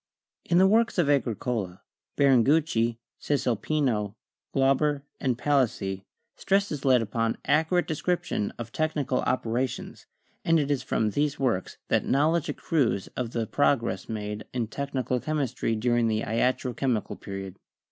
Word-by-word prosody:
In 170 Hz, -, +2 dB
the 185 Hz, -, +6 dB
works 225 Hz, +3 st, +3 dB
of 155 Hz, -5 st, +3 dB
Agricola, 110 Hz, -7 st, -1 dB, 0.3 s
Biringucci, 135 Hz, -3 st, +3 dB, 0.2 s
Caesalpino, 125 Hz, -5 st, 0 dB, 0.4 s
Glau 135 Hz, 0 st, +3 dB
ber 145 Hz, 0 st, 0 dB, 0.2 s
and 125 Hz, -3 st, 0 dB
Palissy, 120 Hz, -8 st, 0 dB, 0.3 s
stress 200 Hz, +1 st, +1 dB
is 145 Hz, -3 st, -4 dB
laid 130 Hz, -4 st, +4 dB
upon 115 Hz, +1 st, -1 dB
accurate 160 Hz, +5 st, +2 dB
description 175 Hz, -, -1 dB
of 115 Hz, -1 st, -7 dB
technical 145 Hz, -4 st, 0 dB
operations, 125 Hz, 0 st, -2 dB, 0.4 s
and 165 Hz, 0 st, +3 dB
it 145 Hz, -1 st, 0 dB
is 140 Hz, -2 st, +1 dB
from 110 Hz, -4 st, 0 dB
these 145 Hz, +4 st, 0 dB
works 120 Hz, -9 st, -1 dB
that -, -, +2 dB
knowledge 155 Hz, +3 st, +2 dB
accrues 125 Hz, -, 0 dB
of 125 Hz, -2 st, -4 dB
the 115 Hz, -1 st, -2 dB
progress 115 Hz, -7 st, 0 dB
made 105 Hz, -1 st, -4 dB
in 120 Hz, -2 st, 0 dB
technical 130 Hz, -3 st, -2 dB
chemistry 130 Hz, -6 st, -1 dB
during 120 Hz, +1 st, +2 dB
the 110 Hz, -1 st, 0 dB
Iatro 125 Hz, +2 st, 0 dB
chemical 125 Hz, -6 st, -1 dB
Period. 95 Hz, -1 st, -7 dB
130 Hz, 135 wpm, -27 LUFS, 115-145 Hz, 0.4 s, the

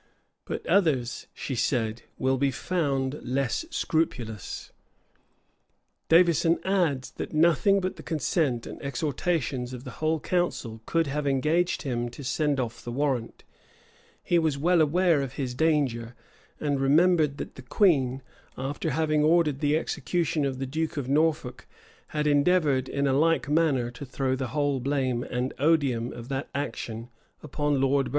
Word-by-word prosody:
"But -, -, -5 dB
others," 140 Hz, -11 st, +1 dB
she 135 Hz, -, -5 dB
said, 115 Hz, -2 st, 0 dB, 0.2 s
"will 130 Hz, 0 st, +1 dB
be 140 Hz, 0 st, +3 dB
found 140 Hz, -2 st, -1 dB
less 130 Hz, -, -1 dB
scrupulous." 120 Hz, -, -2 dB, 1.4 s
Davison 170 Hz, 0 st, +5 dB
adds, 170 Hz, -9 st, +1 dB
that -, -, -5 dB
nothing 170 Hz, +6 st, +4 dB
but 185 Hz, 0 st, -3 dB
the -, -, -8 dB
consent 150 Hz, -5 st, 0 dB
and -, -, -8 dB
exhortations 140 Hz, -1 st, -2 dB
of 125 Hz, -1 st, -7 dB
the 130 Hz, -, -7 dB
whole 160 Hz, 0 st, +1 dB
council 140 Hz, -11 st, -2 dB
could 165 Hz, 0 st, +2 dB
have 145 Hz, +1 st, -2 dB
engaged 155 Hz, +6 st, +1 dB
him 120 Hz, -3 st, -2 dB
to 125 Hz, +4 st, -10 dB
send 145 Hz, +1 st, 0 dB
off 120 Hz, -2 st, -4 dB
the 120 Hz, -, -5 dB
warrant: 130 Hz, -3 st, -2 dB, 0.8 s
he 175 Hz, -, +3 dB
was 155 Hz, -4 st, 0 dB
well 170 Hz, +3 st, +3 dB
aware 165 Hz, 0 st, +3 dB
of 135 Hz, -1 st, -4 dB
his 130 Hz, -3 st, -3 dB
danger; 125 Hz, -6 st, 0 dB, 0.4 s
and 145 Hz, -2 st, 0 dB
remembered 150 Hz, +1 st, +3 dB
that -, -, -6 dB
the -, -, -11 dB
queen, 135 Hz, -4 st, +2 dB, 0.3 s
after 140 Hz, +4 st, -3 dB
having 155 Hz, +1 st, +1 dB
ordered 155 Hz, -3 st, +3 dB
the 150 Hz, +1 st, +2 dB
execution 160 Hz, -2 st, -1 dB
of 135 Hz, -2 st, -2 dB
the 135 Hz, -, -3 dB
duke 155 Hz, +4 st, -3 dB
of 135 Hz, -3 st, -2 dB
Norfolk, 150 Hz, -4 st, 0 dB, 0.4 s
had 150 Hz, -1 st, -2 dB
endeavored, 145 Hz, -3 st, +3 dB
in 140 Hz, 0 st, -1 dB
a 135 Hz, -, +2 dB
like 165 Hz, +3 st, +2 dB
manner, 145 Hz, -6 st, +2 dB
to 125 Hz, +3 st, -9 dB
throw 130 Hz, 0 st, -1 dB
the 130 Hz, 0 st, -3 dB
whole 145 Hz, -1 st, 0 dB
blame 130 Hz, -2 st, 0 dB
and 125 Hz, +1 st, -3 dB
odium 135 Hz, -6 st, +2 dB
of 120 Hz, 0 st, -9 dB
that 135 Hz, 0 st, -3 dB
action 120 Hz, -5 st, -4 dB, 0.3 s
upon 145 Hz, -1 st, -1 dB
Lord 135 Hz, +1 st, +2 dB
Burleigh. -, -, -6 dB
140 Hz, 155 wpm, -27 LUFS, 130-160 Hz, 1.4 s, Davison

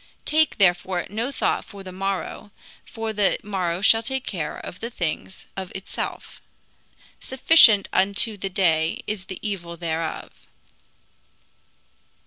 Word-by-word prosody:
Take 315 Hz, +1 st, +2 dB
therefore 180 Hz, -1 st, +2 dB
no 230 Hz, +6 st, -2 dB
thought -, -, 0 dB
for 200 Hz, -1 st, -11 dB
the 185 Hz, -, -8 dB
morrow; 195 Hz, +2 st, -4 dB, 0.3 s
for 225 Hz, -1 st, -5 dB
the 205 Hz, -2 st, +2 dB
morrow 185 Hz, -4 st, -2 dB
shall 225 Hz, +2 st, +5 dB
take 265 Hz, +2 st, -3 dB
thought 160 Hz, -7 st, -4 dB
for 180 Hz, -, -8 dB
the 230 Hz, -, -4 dB
things 155 Hz, -, -4 dB
of 190 Hz, -1 st, -5 dB
itself. 190 Hz, -, -6 dB, 0.8 s
Sufficient 255 Hz, -6 st, +6 dB
unto 200 Hz, +3 st, +2 dB
the 195 Hz, -1 st, -4 dB
day 165 Hz, -4 st, +1 dB
is 210 Hz, -3 st, -4 dB
the 185 Hz, -1 st, -7 dB
evil 175 Hz, -4 st, -5 dB
thereof." 165 Hz, -1 st, -3 dB
195 Hz, 125 wpm, -23 LUFS, 175-215 Hz, 0.8 s, Sufficient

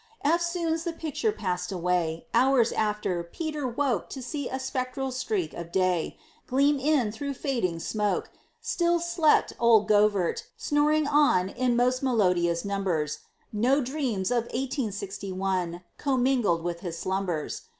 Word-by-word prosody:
Eftsoons 335 Hz, 0 st, +1 dB
the 340 Hz, -1 st, -3 dB
picture 325 Hz, -, -1 dB
passed 180 Hz, -, -3 dB
away; 175 Hz, -3 st, -1 dB
Hours 250 Hz, -1 st, +4 dB
after, 210 Hz, -5 st, -1 dB
Peter 300 Hz, -, -4 dB
woke 245 Hz, -5 st, -1 dB
To 265 Hz, -, -6 dB
see 285 Hz, +2 st, -4 dB
a 260 Hz, -, -3 dB
spectral 260 Hz, 0 st, -3 dB
streak 360 Hz, -, -2 dB
of 170 Hz, 0 st, -7 dB
day 185 Hz, -3 st, 0 dB, 0.3 s
Gleam 280 Hz, +2 st, +3 dB
in 270 Hz, -6 st, +2 dB
through 280 Hz, +5 st, -4 dB
fading 235 Hz, -, -1 dB
smoke; 210 Hz, +3 st, -1 dB, 0.3 s
Still 345 Hz, -7 st, +1 dB
slept 340 Hz, -2 st, +2 dB
old 225 Hz, -3 st, +5 dB
Govert, 205 Hz, -4 st, +3 dB, 0.2 s
snoring 300 Hz, +1 st, +2 dB
on 285 Hz, -11 st, +3 dB
In 250 Hz, +3 st, 0 dB
most 250 Hz, +1 st, +2 dB
melodious 180 Hz, -9 st, +2 dB
numbers; 180 Hz, -7 st, -1 dB, 0.3 s
No 250 Hz, +7 st, +3 dB
dreams 250 Hz, -8 st, -1 dB
of 240 Hz, -1 st, +1 dB
Eighteen 260 Hz, -2 st, -2 dB
Sixty 195 Hz, 0 st, -6 dB
One 185 Hz, -2 st, -2 dB, 0.2 s
Commingled 250 Hz, -, +1 dB
with 170 Hz, -1 st, -3 dB
his 170 Hz, -2 st, -5 dB
slumbers. 185 Hz, -5 st, -2 dB
235 Hz, 140 wpm, -27 LUFS, 185-280 Hz, 0.3 s, old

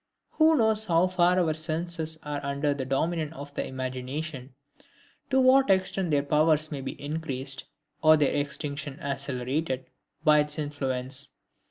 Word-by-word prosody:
Who 315 Hz, 0 st, +4 dB
knows 220 Hz, -2 st, +2 dB
how 170 Hz, -2 st, +3 dB
far 180 Hz, -1 st, +3 dB
our 170 Hz, -4 st, +2 dB
senses 160 Hz, 0 st, -2 dB
are 145 Hz, -1 st, -4 dB
under 140 Hz, +1 st, 0 dB
the 135 Hz, -2 st, -4 dB
dominion 155 Hz, +4 st, -1 dB
of 145 Hz, -1 st, -9 dB
the -, -, -2 dB
imagination, 130 Hz, +1 st, -5 dB, 0.7 s
to 265 Hz, -1 st, +3 dB
what 260 Hz, 0 st, +5 dB
extent 190 Hz, -1 st, +2 dB
their 145 Hz, -2 st, +2 dB
powers 155 Hz, +1 st, +3 dB
may 140 Hz, -2 st, -4 dB
be 135 Hz, -, -6 dB
increased, 140 Hz, -3 st, -4 dB, 0.4 s
or 155 Hz, 0 st, +7 dB
their 145 Hz, -2 st, +2 dB
extinction 145 Hz, 0 st, -3 dB
accelerated, 135 Hz, 0 st, -2 dB, 0.4 s
by 150 Hz, -2 st, +6 dB
its 150 Hz, +1 st, -1 dB
influence? 135 Hz, -2 st, -2 dB
150 Hz, 145 wpm, -27 LUFS, 140-165 Hz, 0.7 s, or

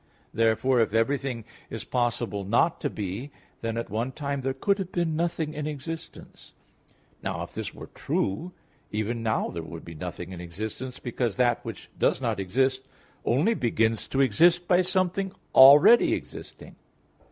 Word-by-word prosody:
Therefore, 115 Hz, +3 st, +2 dB
if 115 Hz, -1 st, +1 dB
everything 125 Hz, 0 st, 0 dB, 0.2 s
is 115 Hz, -, -5 dB
possible 120 Hz, -4 st, -1 dB
not 120 Hz, -, +2 dB
to 145 Hz, -, 0 dB
be, 105 Hz, +5 st, -5 dB, 0.3 s
then 115 Hz, 0 st, -2 dB
at 115 Hz, -, -4 dB
one 115 Hz, +5 st, -1 dB
time 140 Hz, 0 st, -3 dB
there 135 Hz, +1 st, -1 dB
could 200 Hz, +10 st, 0 dB
have 190 Hz, -1 st, -4 dB
been 170 Hz, -3 st, 0 dB
nothing 165 Hz, -2 st, -1 dB
in 150 Hz, 0 st, -4 dB
existence. 160 Hz, +3 st, -8 dB, 0.7 s
Now -, -, -3 dB
if -, -, -9 dB
this -, -, -4 dB
were -, -, -9 dB
true, 105 Hz, -, -2 dB, 0.4 s
even 110 Hz, +2 st, -2 dB
now 110 Hz, -1 st, 0 dB
there 85 Hz, -, -5 dB
would 80 Hz, 0 st, -9 dB
be 85 Hz, -, -9 dB
nothing 90 Hz, +2 st, -6 dB
in 90 Hz, -2 st, -7 dB
existence, 110 Hz, +9 st, -6 dB
because 120 Hz, -3 st, -2 dB
that 120 Hz, -1 st, +2 dB
which 115 Hz, -6 st, -8 dB
does -, -, +2 dB
not -, -, -1 dB
exist 130 Hz, +7 st, +1 dB, 0.4 s
only 150 Hz, -, +3 dB
begins 115 Hz, -, 0 dB
to 135 Hz, -, 0 dB
exist 170 Hz, +8 st, +4 dB
by 180 Hz, 0 st, +5 dB
something 185 Hz, +1 st, 0 dB, 0.2 s
already 145 Hz, -, +8 dB
existing. -, -, -10 dB
125 Hz, 160 wpm, -26 LUFS, 110-155 Hz, 0.7 s, already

